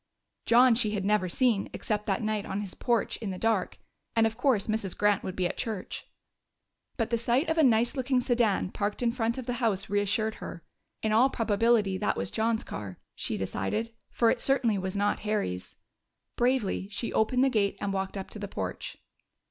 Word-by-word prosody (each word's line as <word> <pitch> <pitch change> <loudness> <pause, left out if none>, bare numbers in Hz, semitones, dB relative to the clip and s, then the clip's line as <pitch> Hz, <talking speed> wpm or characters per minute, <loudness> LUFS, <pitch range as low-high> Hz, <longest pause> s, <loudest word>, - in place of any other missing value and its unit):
John 245 +1 +6
she 220 -2 +1
had 195 -1 -2
never 205 -3 +2
seen, 230 0 +1
except 210 -1 -2
that 200 +2 0
night 215 -1 -1
on 195 +1 -3
his 195 -3 -6
porch, 240 -2 0
in 220 - -5
the 185 - -4
dark; 220 -3 0 0.4
and 225 -1 +4
of 225 0 0
course 245 -5 +2
Mrs. 215 -4 -2
Grant 205 -2 +3
would 185 - -4
be 185 - 0
at - - -2
church. 220 -6 -4 0.9
But 225 -2 -1
the 235 - +1
sight 240 +6 +1
of 320 0 +1
a - - +6
nice 235 -1 +4
looking 260 -1 +1
sedan 235 -7 +1
parked 205 +3 -2
in 235 - +3
front 230 0 -1
of 260 - -5
the 245 - -2
house 200 -5 0
reassured 205 +2 +1
her. 170 - -7 0.4
In 220 - +1
all 235 +5 +5
probability 215 -4 +2
that - - 0
was 95 - -3
John's 220 0 0
car, 95 -1 -7 0.2
she - - -3
decided, 95 - -2 0.2
for 230 -1 +3
it - - -1
certainly 245 -7 +2
was 190 +1 -3
not 205 +1 +1
Harry's. 205 - -3 0.6
Bravely 240 -6 0
she 220 +3 -4
opened 250 +4 +2
the 270 - +4
gate 210 -5 +1
and 200 -1 -2
walked 195 +1 -2
up 190 - -6
to 215 - -7
the 205 - -4
porch. - - -5
215 Hz, 200 wpm, -28 LUFS, 200-235 Hz, 0.9 s, John